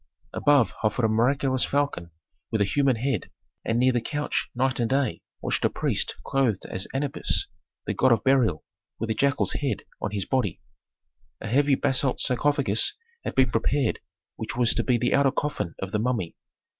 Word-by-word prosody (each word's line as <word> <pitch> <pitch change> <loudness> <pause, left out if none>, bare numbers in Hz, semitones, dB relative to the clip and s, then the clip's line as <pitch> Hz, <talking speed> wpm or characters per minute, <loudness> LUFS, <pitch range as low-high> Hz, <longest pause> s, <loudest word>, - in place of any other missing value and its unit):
Above 145 -5 +3
hovered 110 +2 +1
a - - +4
miraculous 130 +4 +2
falcon 140 -12 -1 0.4
with 110 - 0
a - - +4
human 135 +5 +2
head, 130 +4 -2 0.3
and 115 - 0
near 130 +2 +4
the 120 -1 0
couch 145 +5 -2
night 130 +1 0
and 115 -1 0
day 135 0 0 0.2
watched - - 0
a - - +4
priest - - -1
clothed 125 -8 0
as 95 - -3
Anubis, 140 +1 -1 0.4
the - - -1
god 130 - +3
of 115 - +3
burial, 120 - +2 0.3
with 115 0 -2
a - - +2
jackal's 140 +5 +1
head 140 -3 -2 0.2
on 105 - -1
his 100 -2 -2
body. 125 -9 -1 0.8
A - - -8
heavy 140 +4 +3
basalt 135 -1 +1
sarcophagus 130 -4 +2 0.3
had - - -4
been 130 -3 +3
prepared 130 +2 +1 0.4
which - - -5
was 120 -2 +3
to 120 - 0
be 125 0 +2
the 125 +1 0
outer 140 0 +4
coffin 105 - -3
of 95 0 -5
the 105 - 0
mummy. 115 -7 -1
125 Hz, 180 wpm, -25 LUFS, 110-135 Hz, 0.8 s, a